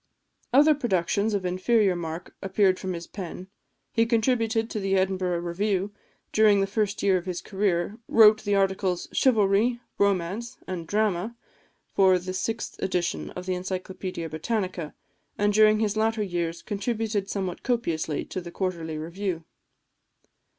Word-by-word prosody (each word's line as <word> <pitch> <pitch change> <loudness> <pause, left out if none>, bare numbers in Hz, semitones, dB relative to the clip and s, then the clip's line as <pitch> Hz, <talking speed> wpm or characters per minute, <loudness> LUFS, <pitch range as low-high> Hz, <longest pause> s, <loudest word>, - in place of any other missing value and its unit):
Other 295 +5 +6
productions 205 - 0
of 195 -2 -2
inferior 190 +2 +2
mark 165 0 -6
appeared 195 -1 +2
from 185 -1 -3
his 170 -1 -6
pen; 185 -1 -8 0.4
he 230 0 +2
contributed 225 -1 +1
to 215 - -2
the 195 -1 0
Edinburgh 185 -2 0
Review, 190 +3 -1 0.4
during 215 -2 +5
the 195 - +3
first 205 0 -1
year 195 -2 +4
of 180 +1 -6
its 180 -1 -2
career; 195 0 -1
wrote 215 -1 +6
the 205 -1 +1
articles, 190 -2 0
"Chivalry," 225 0 +3 0.2
"Romance," 200 +3 0
and 170 -3 -5
"Drama," 210 +1 0 0.5
for 190 -1 +4
the 185 +1 -5
sixth 225 +4 -3
edition 180 -2 -1
of 180 - -6
the 185 - -1
Encyclopædia 185 -1 -4
Britannica; 180 0 -3 0.4
and 205 0 +2
during 215 0 +5
his 215 -1 0
latter 220 0 +1
years 170 -3 -3
contributed 215 -1 -2
somewhat 190 -3 -3
copiously 170 - -1
to 185 - -5
the 170 - -8
Quarterly 170 -4 -3
Review. 170 +2 -3
195 Hz, 145 wpm, -26 LUFS, 180-215 Hz, 0.5 s, Other